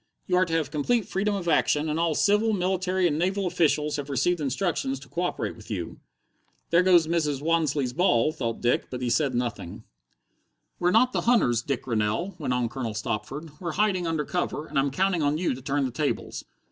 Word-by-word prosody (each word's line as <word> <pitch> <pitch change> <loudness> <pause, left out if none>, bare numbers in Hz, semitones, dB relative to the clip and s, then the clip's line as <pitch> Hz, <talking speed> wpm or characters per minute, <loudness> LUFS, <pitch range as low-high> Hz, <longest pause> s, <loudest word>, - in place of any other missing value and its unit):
You 180 - 0
are 185 - +4
to 165 - -5
have 155 -3 0
complete 200 +10 0
freedom 205 +2 0
of 185 -3 -4
action, 150 -1 +2
and 155 +1 -1
all 165 -2 +1
civil, 210 +5 +3
military, 185 -1 0
and 150 -2 -1
naval 190 +3 0
officials 150 -4 +1
have 145 -1 -5
received 150 +5 +1
instructions 135 -1 -1
to 140 - -14
co 175 - -4
operate 180 - -2
with 110 -2 -14
you." 90 -6 -5 0.7
"There 170 +1 +5
goes 180 -3 +5
Mrs. 155 -4 0
Wansleigh's 155 -6 +1
ball," 145 -4 +3
thought 120 -7 -4
Dick, 120 +1 +1
but 125 0 -5
he 120 - 0
said 140 -3 +1
nothing. 120 -8 -4 1.0
"We're 175 - +2
not 240 +6 +4
the - - 0
hunters, 120 - +3
Dick 135 0 -3
Rennell," 115 - -1
went 145 - -2
on 125 -1 +1
Colonel 115 -2 -4
Stopford. 120 +9 -4
"We're 170 -3 -4
hiding 190 -3 +1
under 160 -2 -1
cover, 175 -3 -2
and 145 -3 -1
I'm 140 +1 +2
counting 185 +4 +1
on 145 +1 +1
you 170 -3 0
to 130 - -8
turn 140 +1 0
the 130 - -3
tables. 145 +4 -3
155 Hz, 205 wpm, -26 LUFS, 130-180 Hz, 1.0 s, There